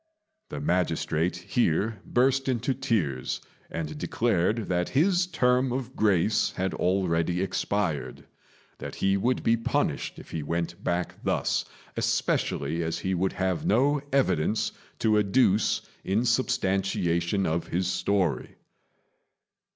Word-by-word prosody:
The - - -5
magistrate 90 - 0
here 100 +2 0
burst 135 +2 +2
into 130 +1 0
tears, 100 - -1 0.3
and 75 -2 -5
declared 110 -1 0
that 90 -1 0
his 180 +3 +3
term 125 -6 +2
of 130 0 -4
grace 105 0 +2
had 95 0 -2
already 90 -2 +1
expired: 95 -4 -2 0.5
that - - -6
he 95 0 +2
would 120 +6 0
be 115 - +4
punished 115 - -1
if - - -12
he 80 - -3
went 85 +4 -3
back 85 0 -2
thus, - - 0 0.3
especially 75 +4 0
as 80 0 -2
he 95 - -2
would 95 +1 0
have 95 -2 -1
no 140 +6 +3
evidence 110 - +1 0.3
to 110 -1 +3
adduce 105 0 +3 0.2
in 105 +6 +1
substantiation 95 -7 +1
of 80 +1 -1
his 90 +2 -1
story. 90 -7 0
95 Hz, 120 wpm, -27 LUFS, 85-120 Hz, 0.5 s, be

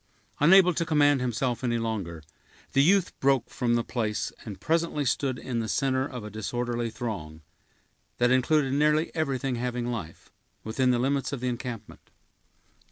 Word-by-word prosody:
Unable 180 +4 +6
to 170 - 0
command 145 -4 +3
himself 125 0 -1
any 120 -1 +1
longer, 100 -8 -4 0.5
the 135 - +5
youth 185 +4 +4
broke 135 -3 +2
from 120 -1 0
the 120 - +1
place, 110 -4 -2
and 105 -4 -8
presently 165 -3 0
stood 130 +1 0
in 120 -1 -3
the 115 - -2
center 130 +2 0
of 125 -5 -7
a 105 - -7
disorderly 120 +2 -2
throng, 90 -10 -6 0.8
that 120 0 +3
included 135 +2 +2
nearly 150 +3 +2
everything 135 -5 -1
having 125 0 -2
life, 90 -9 -7 0.3
within 125 +4 0
the 125 - +3
limits 135 +3 0
of 140 - -3
the 125 +1 -1
encampment. 120 -3 -7
125 Hz, 160 wpm, -27 LUFS, 115-140 Hz, 0.8 s, Unable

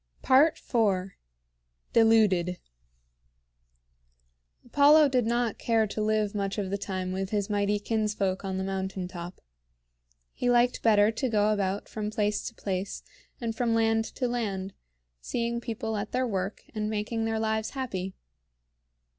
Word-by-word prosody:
IV. 230 - +3 0.8
DELUDED. 210 -6 +4 2.1
Apollo 290 +4 +6
did 250 -4 +1
not 235 -1 0
care 225 -2 +2
to 215 +1 -4
live 215 -1 +1
much 200 -1 -2
of 195 -2 -2
the 200 - 0
time 185 -2 -3
with 190 0 -3
his 205 0 -1
mighty 205 0 +1
kinsfolk 205 -3 -1
on 190 -1 -3
the 190 - -2
mountain 190 -1 -3
top. 175 0 -8 0.9
He 245 - -1
liked 245 0 +3
better 210 -1 +5
to 255 +3 -2
go 210 -1 +3
about 200 -1 -2
from 210 -1 -4
place 210 -1 0
to 230 - -8
place 190 0 -4 0.4
and 230 -2 -3
from 230 -1 +1
land 225 0 +2
to 250 - 0
land, 200 -6 -3 0.5
seeing 235 - -2
people 225 -2 -3
at 205 - -4
their 255 +1 +1
work 195 -3 -3
and 215 -1 -2
making 220 +1 -2
their 225 0 -1
lives 220 0 -1
happy. 190 -8 -4
215 Hz, 140 wpm, -28 LUFS, 195-230 Hz, 2.1 s, Apollo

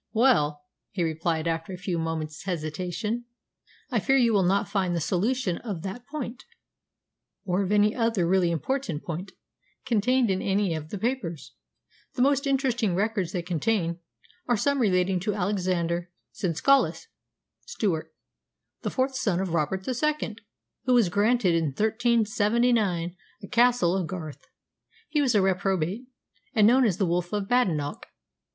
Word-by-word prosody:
"Well," 155 - +3 0.3
he 180 - -2
replied 160 0 -1
after 165 +3 -2
a - - -6
few 180 -2 -2
moments' 160 -1 -4
hesitation, 180 +7 -3 0.7
"I - - +2
fear 270 0 +3
you 235 -3 +3
will 200 - +4
not 190 +2 +2
find 190 -3 0
the - - 0
solution 190 - 0
of 200 -9 -5
that 225 +6 -6
point, 260 -5 -6 1.0
or 185 +1 +1
of 195 0 -2
any 210 +1 +4
other 230 -7 +1
really 185 -1 +3
important 170 - -2
point, 180 +3 -5 0.5
contained 245 -1 +2
in 190 - 0
any 195 -2 +1
of 155 -1 -5
the 205 - -4
papers. 210 - -3 0.6
The 250 - +2
most 280 +1 +2
interesting 250 -8 +1
records 200 -2 0
they 175 - -3
contain 175 0 -1 0.5
are 240 -2 +2
some 280 +5 +1
relating 185 -4 +2
to 205 +2 -2
Alexander 180 -3 -1 0.2
Senescallus 190 - +2 0.6
(Stewart), 195 - -2 0.7
the - - -2
fourth 265 +1 0
son 200 -8 0
of 190 -3 -2
Robert 170 +4 -1
II., 280 -2 -1 0.5
who 255 -1 +4
was 230 -7 +4
granted 205 0 +2
in 165 -1 +2
1379 215 - +1 0.3
a - - -7
Castle 235 -7 +3
of 185 -4 -1
Garth. 160 -5 -7 0.6
He 300 -1 +1
was 255 -5 +2
a 200 - +4
reprobate, 190 +3 0 0.5
and 215 -2 +5
known 250 +4 +5
as 190 -6 +1
the 195 - +1
Wolf 175 0 -1
of 205 -2 -1
Badenoch. 170 -13 0
195 Hz, 150 wpm, -26 LUFS, 175-235 Hz, 1.0 s, and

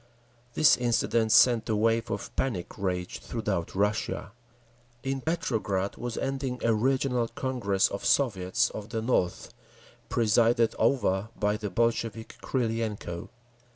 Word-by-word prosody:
This 155 - +6
incident 115 -2 +1
sent 115 -1 +5
a 110 - +2
wave 115 +2 +1
of - - -5
panic 105 -10 -2
rage 90 -2 -3
throughout 105 -8 -3
Russia…. 105 +1 -1 0.7
In 135 0 -2
Petrograd 110 - -1
was 120 -2 -5
ending 135 -2 -2
a 115 - +3
regional 125 +1 +1
Congress 115 -8 0
of 100 - -6
Soviets 115 -2 +2
of 105 0 -7
the 110 -1 -3
North, 100 -7 0 0.6
presided 115 +1 +3
over 105 -6 +1
by 105 0 +1
the 105 -1 -4
Bolshevik 115 0 -1
Krylenko. 110 -8 -2
115 Hz, 120 wpm, -28 LUFS, 105-120 Hz, 0.7 s, This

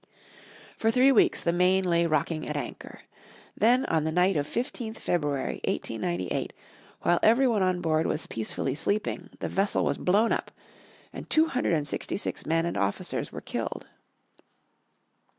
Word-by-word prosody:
For 225 - +1
three 255 +4 +5
weeks 250 - +3
the 170 - +1
Maine 185 +2 +3
lay 170 -2 +2
rocking 155 0 -1
at 150 - -3
anchor. 145 - -7 0.5
Then 245 +5 +3
on 160 -2 +1
the 160 - -1
night 180 +3 +3
of 145 -1 0
15th 230 0 -4
February, 145 -5 -1
1898, 90 -5 -2 0.5
while 175 0 +3
every 240 +5 +5
one 220 -5 +1
on 185 -1 +1
board 160 -1 +1
was 155 - -2
peacefully 115 +4 -3
sleeping 205 +8 -2
the - - -1
vessel 195 +1 +1
was - - -1
blown 210 +5 +3
up, - - -1 0.6
and - - -8
two 315 +1 +5
hundred 255 -8 0
and 150 -3 0
sixty - - -3
six - - -4
men 165 +1 +2
and 170 - -2
officers 100 0 -2
were - - -7
killed. - - -4
175 Hz, 160 wpm, -27 LUFS, 155-215 Hz, 0.6 s, three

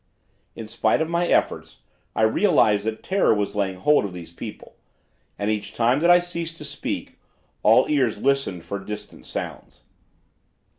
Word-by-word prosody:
"In 115 - -7
spite 110 - +1
of 160 0 -1
my 170 +1 +1
efforts, - - 0 0.4
I - - +1
realized 110 - +3
that 110 0 -3
terror 190 - +2
was 105 -1 -1
laying 100 -2 -1
hold 150 +9 +3
of 100 -3 -5
these 85 -1 -10
people, - - -9 0.6
and 100 +1 -1
each 105 -1 -4
time 120 +3 +3
that 170 +3 +3
I 175 - +9
ceased 170 -2 -4
to - - -8
speak, - - -5 0.4
all - - +5
ears 130 -8 +1
listened 135 -9 0
for 100 - -4
distant 105 +2 -9
sounds. - - -7
110 Hz, 160 wpm, -23 LUFS, 100-160 Hz, 0.6 s, I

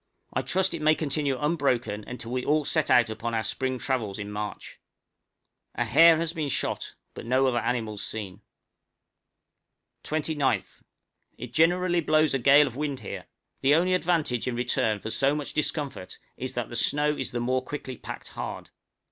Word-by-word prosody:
I - - +1
trust 190 0 +1
it 165 - -4
may 155 +1 +4
continue 145 -3 -1
unbroken 135 -9 0
until 125 -2 -7
we 125 0 -1
all 150 0 +2
set 155 0 +1
out 120 -2 +5
upon 115 +1 -3
our 110 - 0
spring 130 +4 -2
travels 115 -6 -2
in 105 0 -6
March. 105 0 -6 1.0
A - - 0
hare 165 0 +7
has 165 0 -1
been 155 -4 -2
shot, - - -2 0.2
but - - -8
no 130 +2 +3
other 125 -2 +2
animals 110 -5 -2
seen. 100 -2 -6 1.6
{ANOTHER 155 - -4
OBSERVATORY 155 +1 -2
BUILT.} 140 -3 +3
29th. - - -19 0.5
It 125 0 -8
generally 175 +3 +3
blows 155 -1 +3
a 135 - +1
gale 140 +4 +7
of 120 - -6
wind 145 -2 -3
here; - - -7 0.3
the 140 +2 +5
only 180 +3 +2
advantage 165 -10 0
in 125 - -1
return 120 -3 +1
for 110 +2 -6
so 135 +4 +2
much 150 -2 -4
discomfort 150 - -3 0.2
is - - -5
that - - -2
the - - -7
snow 150 +1 +2
is - - -2
the 120 - -3
more 130 +2 0
quickly 130 -1 -6
packed - - -8
hard. - - -6
135 Hz, 180 wpm, -27 LUFS, 120-155 Hz, 1.6 s, hare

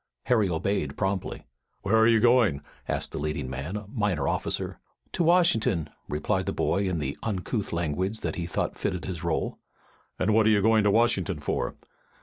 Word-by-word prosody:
Harry 110 -5 +2
obeyed 80 -3 -1
promptly. 95 -1 -2 0.4
"Where 100 +3 +2
are 110 0 +6
you 115 -1 +5
going?" 115 - +4 0.2
asked - - -1
the - - -4
leading 75 -2 -2
man, 70 +8 -5
a 105 0 -5
minor 105 - -1
officer. - - -2 0.3
"To - - 0
Washin'ton," 145 - +3 0.2
replied 75 +1 -1
the - - +1
boy 100 +1 +1
in 90 - -1
the 70 -2 -2
uncouth 105 +1 -2
language 85 +6 -2
that 80 - -2
he 85 -2 -4
thought - - -2
fitted 90 - -3
his 90 -2 -5
role. 85 -2 -1 0.6
"And 110 - +1
what 110 0 +4
are - - +6
you 105 -2 +3
going 110 -1 +4
to - - +5
Washington 100 -6 +2
for?" 70 - -2
95 Hz, 180 wpm, -27 LUFS, 80-110 Hz, 0.6 s, are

